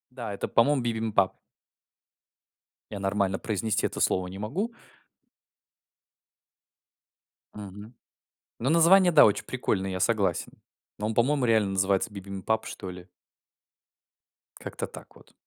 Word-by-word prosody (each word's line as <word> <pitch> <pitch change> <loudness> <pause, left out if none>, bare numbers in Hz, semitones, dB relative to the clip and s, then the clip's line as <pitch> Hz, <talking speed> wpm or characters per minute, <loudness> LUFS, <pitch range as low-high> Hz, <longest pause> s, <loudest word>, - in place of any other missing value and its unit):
Да, 115 -5 -5
это, 100 - -4
по-моему, 135 +4 +3
бибимпаб. 110 -5 0 1.6
Я 100 - -5
нормально 95 -1 0
произнести 110 0 -1
это - - -6
слово 95 -1 +1
не 95 +1 -8
могу. 145 - -2 2.9
Мгм. 105 +2 -10 0.7
Но 130 +4 0
название, 175 +2 +6
да, 155 - +8
очень 105 -1 +2
прикольное, 95 -6 -2
я 95 0 -4
согласен. - - 0 0.5
Но 105 - -2
он, 110 - -2
по-моему, 130 +4 +2
реально 110 -4 +3
называется 95 +3 +1
бибимпаб 100 +2 -3
что 95 - -7
ли. 90 0 -11 1.5
Как-то - - -6
так - - -13
вот. - - -20
105 Hz, 115 wpm, -27 LUFS, 95-120 Hz, 2.9 s, да